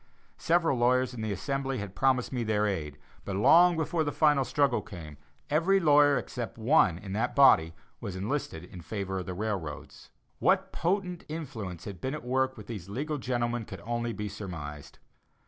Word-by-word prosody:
Several 165 -6 +2
lawyers 125 +1 +2
in 115 - -6
the 110 -1 -2
Assembly 135 +6 -2
had 105 -3 -6
promised 130 +1 +1
me 125 -2 -1
their 105 -1 +1
aid, 75 -8 -3 0.3
but 100 - -4
long 170 - +6
before 160 +1 0
the 145 - -2
final 150 -3 +3
struggle 140 -1 +1
came, 80 -7 -10 0.3
every 170 +6 +3
lawyer 145 -4 +5
except - - -5
one 80 - +3
in 95 +1 -7
that 115 +4 -1
body 80 - +6 0.2
was 95 - -6
enlisted 95 - -3
in 90 0 -11
favor 95 0 -4
of 90 - -7
the 90 - -4
railroads! 95 -7 -5 0.3
What - - +2
potent 180 0 -1
influence 120 - -6
had 95 -4 -8
been 130 +3 -2
at 150 - -8
work 130 +1 0
with 105 - -9
these 100 -5 -7
legal 145 +7 -3
gentlemen 120 -2 -1
could - - -9
only 120 +2 -2
be 105 -2 -4
surmised. 80 -8 -8
120 Hz, 180 wpm, -29 LUFS, 95-145 Hz, 0.3 s, long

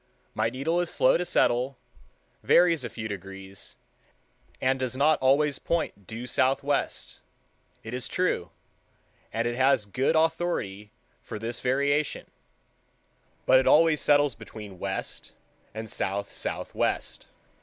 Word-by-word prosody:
My 110 +1 +1
needle 140 +8 -1
is 175 - -2
slow 130 - +4
to 175 - -1
settle—varies 135 +4 +1
a 120 - -4
few 110 +1 -5
degrees, 95 -1 -8 0.8
and 130 +1 +1
does 130 -1 -2
not 150 +3 +4
always 140 +2 +3
point 155 - -2
due 115 +2 -6
southwest, 135 +3 0 0.6
it 115 - -7
is 125 0 -3
true, 180 - 0 0.8
and 115 +1 -1
it 120 - -2
has 130 -3 +3
good 130 +10 0
authority 160 - 0 0.3
for - - -7
this 115 +2 -4
variation, 140 +3 +1 1.2
but 130 - +6
it 130 - 0
always 155 -2 +5
settles 145 -2 +4
between 105 -4 -10
west 95 -1 -5 0.4
and 110 +1 -6
south 100 -1 -3
southwest. - - -3
130 Hz, 125 wpm, -27 LUFS, 110-145 Hz, 1.2 s, but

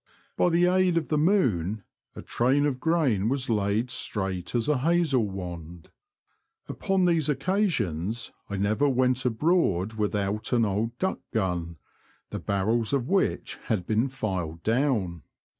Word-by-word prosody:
By - - +3
the 170 +1 +3
aid 180 -1 +3
of 160 - -1
the 155 - +1
moon 110 - +1 0.3
a - - -8
train 135 +4 +1
of 135 -3 -1
grain 130 - +1
was 135 -2 -1
laid 105 +3 0
straight 95 -4 -3
as 120 +1 0
a 150 -3 +2
hazel 150 -7 +2
wand. 85 -3 -8 0.8
Upon 190 -1 0
these 165 -4 +2
occasions 120 - -1 0.2
I 100 - -3
never 110 +9 +2
went 130 0 +1
abroad 115 - +1
without 105 +1 -1
an 115 -2 +3
old 110 +4 -2
duck 190 0 -1
gun, 90 -6 -2 0.5
the - - -4
barrels 110 +5 0
of 135 -2 0
which 195 0 0
had 105 -7 -1
been 110 +6 +1
filed 95 -11 -4
down. 110 - 0
115 Hz, 140 wpm, -26 LUFS, 100-145 Hz, 0.8 s, By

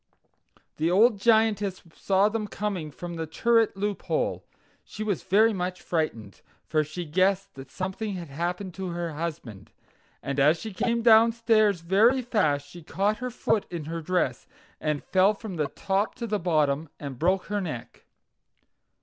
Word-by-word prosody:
The 160 +2 +1
old 210 +4 +4
Giantess 210 -3 +2
saw 195 +1 +2
them 215 0 -2
coming 200 -7 -3
from 175 +4 -8
the 160 -1 -3
turret 225 +5 +2
loophole. 205 - -2 0.4
She 215 - -7
was 205 -4 -1
very 215 +4 +4
much 180 -1 -3
frightened, 115 - -3 0.2
for 155 -1 +1
she 155 +4 -6
guessed 190 +4 +1
that 135 0 -11
something 190 +4 -4
had 170 -4 -7
happened 175 +5 -3
to 190 +1 -5
her 170 -1 -4
husband; 145 -10 -6 0.5
and 140 0 -2
as 150 +4 +5
she 220 -2 -7
came 235 +5 0
downstairs 225 -4 +4
very 220 +9 +3
fast 155 -12 +1
she 175 - -12
caught 200 +6 0
her 250 +2 -4
foot 220 -2 0
in 165 -4 -5
her 165 +1 -4
dress, 155 -7 -1 0.3
and 150 -2 -2
fell 190 +3 +3
from 200 -4 -7
the 150 -2 0
top 195 +7 -1
to 240 - -5
the 210 -2 -1
bottom 155 -3 +1
and 140 -4 -7
broke 185 +3 +1
her 205 0 -2
neck. 150 -10 -7
185 Hz, 160 wpm, -26 LUFS, 160-210 Hz, 0.5 s, as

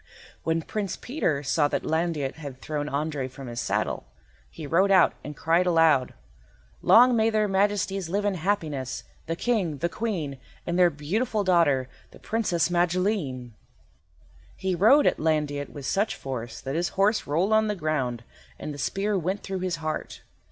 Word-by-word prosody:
When 165 0 0
Prince 205 0 -3
Peter 170 - -2
saw 145 +2 +2
that - - -2
Landiot 160 -4 -1
had 140 -5 -8
thrown 150 +1 -3
Andrei 145 -2 -2
from 130 +1 -10
his 120 -1 -4
saddle, - - -2 0.4
he 150 - -9
rode 180 +7 +3
out 190 -1 +5
and 150 -1 -8
cried 170 +3 +2
aloud— 160 -7 +3 0.7
"Long 245 +1 +6
may 220 0 +3
their 215 -1 +1
Majesties 195 -2 0
live 205 +3 -1
in 205 - +2
happiness, 155 - -2 0.2
the 165 - -1
King, 190 -8 0
the 170 +5 -1
Queen, 170 - -3 0.3
and 170 +1 -1
their 180 -1 +6
beautiful 200 - -1
daughter, 165 -9 +3 0.2
the - - -15
Princess 180 -7 0
Magilene." 175 - 0 1.0
He 190 -1 -2
rode 225 - +5
at - - +2
Landiot 150 -3 0
with 145 -3 -9
such 200 +9 0
force 120 -4 -6
that 135 - -4
his 170 +3 0
horse 205 +3 +2
rolled 175 +9 +1
on 220 0 +4
the 210 - -1
ground 135 - -2 0.3
and 150 - -6
the 145 - -9
spear 200 +8 -1
went 185 +4 -2
through 190 -1 -4
his 180 -2 -1
heart. 155 -1 -5
165 Hz, 165 wpm, -26 LUFS, 145-195 Hz, 1.0 s, Long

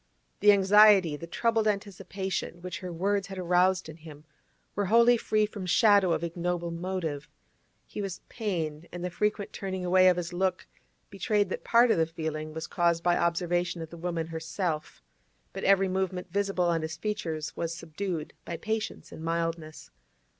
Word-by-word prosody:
The 210 - +7
anxiety, 200 -4 +6
the 170 +3 -8
troubled 225 +4 +1
anticipation, 195 -3 -3
which 180 - -5
her 180 -1 -6
words 195 +3 0
had 190 -1 -8
aroused 180 +1 +2
in 160 0 -10
him, 155 -2 -12 0.5
were 205 - -1
wholly 235 +3 +6
free 215 -2 +1
from 205 -3 -7
shadow 200 -2 +5
of 165 - 0
ignoble 170 0 -2
motive; 170 -4 -4 0.6
he - - -6
was 195 -3 -5
pained, 170 -8 -3
and 175 0 -5
the 180 - -3
frequent 210 +3 -1
turning 190 -2 -4
away 185 +1 +5
of 180 - +2
his 175 0 -4
look 185 0 -1 0.5
betrayed 205 0 0
that - - -4
part 235 0 +5
of - - +2
the 160 - +2
feeling 155 -1 -4
was 160 +1 -5
caused 170 -1 +1
by 175 0 +3
observation 175 0 0
of 160 - -10
the - - -8
woman 170 -1 -3
herself, 160 0 -4 0.5
but - - -6
every 195 0 +4
movement 185 -1 -2
visible 195 -3 +1
on 170 -1 +1
his 160 0 -5
features 165 -5 -3
was 165 -1 -2
subdued 170 0 -5
by 170 - -5
patience 220 +2 -4
and 160 - -9
mildness. 165 -1 -3
180 Hz, 170 wpm, -28 LUFS, 165-195 Hz, 0.6 s, The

